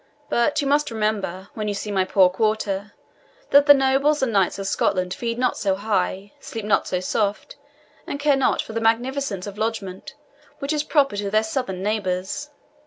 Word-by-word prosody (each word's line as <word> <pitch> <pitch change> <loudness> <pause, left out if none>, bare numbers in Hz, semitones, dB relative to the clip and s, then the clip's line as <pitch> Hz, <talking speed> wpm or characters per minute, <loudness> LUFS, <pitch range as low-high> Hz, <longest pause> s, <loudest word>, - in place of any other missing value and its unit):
But 235 +5 +2
you - - -1
must 290 +2 +2
remember, 210 -4 -2
when 215 -1 -4
you 205 - -1
see 210 +1 -4
my 190 -2 +1
poor 185 0 +5
quarter, 205 +1 -1 0.6
that 285 +1 +6
the 290 - +11
nobles 270 +2 +2
and 240 -4 0
knights 195 -2 +2
of 195 - -5
Scotland 185 -1 0
feed 230 -1 -3
not 250 0 0
so 195 -2 +1
high, 200 -1 -2
sleep 225 -2 -7
not 210 - +2
so 180 - -1
soft, 200 +5 -2 0.5
and 280 - -4
care 290 -1 +3
not 270 - +1
for 220 - -9
the 230 - -2
magnificence 230 -2 0
of 205 0 -8
lodgment 215 -4 -4 0.4
which 280 +2 -2
is 300 - +1
Proper 280 -8 +1
to 200 0 -2
their 215 +2 +2
southern 220 -5 -3
neighbours. 200 +5 -2
215 Hz, 185 wpm, -23 LUFS, 195-265 Hz, 0.6 s, the